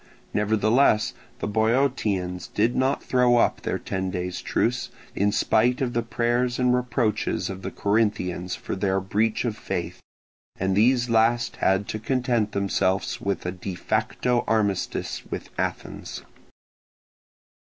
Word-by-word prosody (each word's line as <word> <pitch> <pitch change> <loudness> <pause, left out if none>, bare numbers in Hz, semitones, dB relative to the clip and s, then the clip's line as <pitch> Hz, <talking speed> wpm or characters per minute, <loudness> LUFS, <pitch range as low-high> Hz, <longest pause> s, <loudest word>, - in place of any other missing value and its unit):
Nevertheless 110 +2 +3 0.2
the - - -3
Boeotians 110 -5 0
did 115 +4 +1
not 130 +1 +1
throw 125 -1 +3
up - - +2
their - - -1
ten 95 0 -3
days' 90 -1 -3
truce, 120 +1 0 0.3
in 100 +1 +2
spite 110 +3 +2
of 125 -3 -1
the 120 - +1
prayers 120 +1 0
and 125 -1 +3
reproaches 120 -6 0
of 95 0 -7
the - - -4
Corinthians 100 -4 0
for - - -5
their 95 0 +1
breach 105 +5 0
of 115 -3 -1
faith; - - -4 0.6
and 95 0 +1
these 120 +4 +4
last 115 +2 +2
had 95 +1 +2
to 110 - -3
content 120 -2 0
themselves 95 -1 0
with 100 -2 -2
a 90 - -1
de 95 0 -6
facto 120 +7 0
armistice 105 -4 0
with - - -5
Athens. - - -4
110 Hz, 135 wpm, -25 LUFS, 95-120 Hz, 0.6 s, these